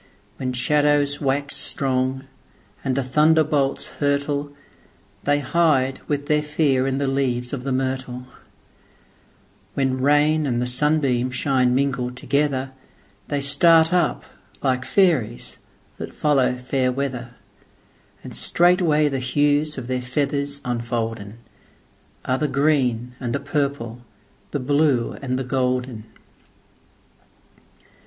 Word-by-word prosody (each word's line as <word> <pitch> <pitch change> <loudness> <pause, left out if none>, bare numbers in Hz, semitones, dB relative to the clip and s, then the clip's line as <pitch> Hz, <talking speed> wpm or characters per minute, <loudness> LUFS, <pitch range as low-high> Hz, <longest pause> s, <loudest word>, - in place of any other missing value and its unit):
When 130 -1 -3
shadows 145 +2 +2
wax 140 0 -1
strong, 130 0 +1 0.6
and 130 - -1
the 140 - 0
thunder 155 +5 +4
bolts 140 -2 0
hurtle, 145 0 0 0.7
They 145 0 +2
hide 135 -3 +1
with 145 -1 -2
their 150 0 +2
fear 150 -3 +1
in 135 0 -1
the 140 - 0
leaves 130 -2 -1
of 130 -3 -4
the 135 - -3
myrtle; 130 -1 -3 1.5
When 130 -1 0
rain 150 +2 +3
and 120 -2 0
the 125 - 0
sunbeams 130 -1 +1
shine 130 -2 +2
mingled 130 -2 -1
togetherThey 135 -2 -3
start 160 +4 +5
up 175 -3 +1 0.4
like 130 -1 0
fairies 150 - +1 0.4
that - - -7
follow 135 -4 +2
fair 125 0 0
weather, 125 -2 -4 0.9
And - - -9
straightway 170 -4 +3
the 135 -2 -2
hues 145 +3 +1
of 130 - -5
their 130 0 -2
feathers 140 +2 -2
unfoldenAre 115 +1 -6
the 150 - +1
green 130 -5 +1
and 120 -1 -3
the - - -1
purple, 140 -5 -3 0.5
the 145 - -3
blue 140 -2 +1
and 130 -2 -2
the 130 - -2
golden. 125 -3 -2
135 Hz, 115 wpm, -22 LUFS, 125-145 Hz, 1.5 s, start